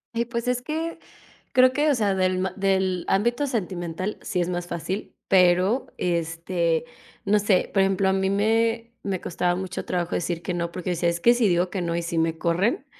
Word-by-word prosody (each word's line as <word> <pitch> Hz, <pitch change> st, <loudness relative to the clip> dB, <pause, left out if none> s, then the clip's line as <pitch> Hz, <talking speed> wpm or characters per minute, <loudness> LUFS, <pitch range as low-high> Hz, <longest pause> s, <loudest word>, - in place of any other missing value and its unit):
Ay, 235 Hz, +1 st, +1 dB
pues 235 Hz, 0 st, -4 dB
es 250 Hz, 0 st, +1 dB
que 320 Hz, +5 st, -4 dB, 0.5 s
creo 255 Hz, -1 st, +6 dB
que, 295 Hz, +3 st, +2 dB
o 285 Hz, -, +3 dB
sea, 210 Hz, -4 st, +1 dB
del 185 Hz, -1 st, +1 dB
ma 185 Hz, 0 st, -1 dB
del 190 Hz, -2 st, +1 dB
ámbito 235 Hz, +8 st, +1 dB
sentimental 185 Hz, -4 st, -3 dB
sí 180 Hz, -3 st, -1 dB
es 175 Hz, -, -1 dB
más 175 Hz, -1 st, -3 dB
fácil, 175 Hz, +4 st, -4 dB
pero 185 Hz, +6 st, +3 dB
este 170 Hz, +1 st, -1 dB, 0.4 s
no 210 Hz, +1 st, +3 dB
sé, 200 Hz, -2 st, +2 dB
por 195 Hz, -, +4 dB
ejemplo, 195 Hz, 0 st, +2 dB
a -, -, +2 dB
mí 190 Hz, 0 st, +1 dB
me 225 Hz, +3 st, +1 dB
me 195 Hz, -2 st, -2 dB
costaba 175 Hz, +1 st, -1 dB
mucho 185 Hz, 0 st, -5 dB
trabajo 175 Hz, -1 st, -2 dB
decir 170 Hz, 0 st, -2 dB
que 180 Hz, -, -2 dB
no, 170 Hz, -1 st, -2 dB
porque 180 Hz, +1 st, -4 dB
decía: 170 Hz, 0 st, +1 dB
"Es 170 Hz, 0 st, -2 dB
que 235 Hz, +7 st, +5 dB
si 240 Hz, -3 st, +2 dB
digo 175 Hz, +1 st, +2 dB
que 190 Hz, -, -2 dB
no 170 Hz, -1 st, -1 dB
y 170 Hz, -, -1 dB
sí 170 Hz, 0 st, -1 dB
me 165 Hz, 0 st, 0 dB
corren 185 Hz, -, 0 dB
190 Hz, 210 wpm, -24 LUFS, 175-225 Hz, 0.5 s, creo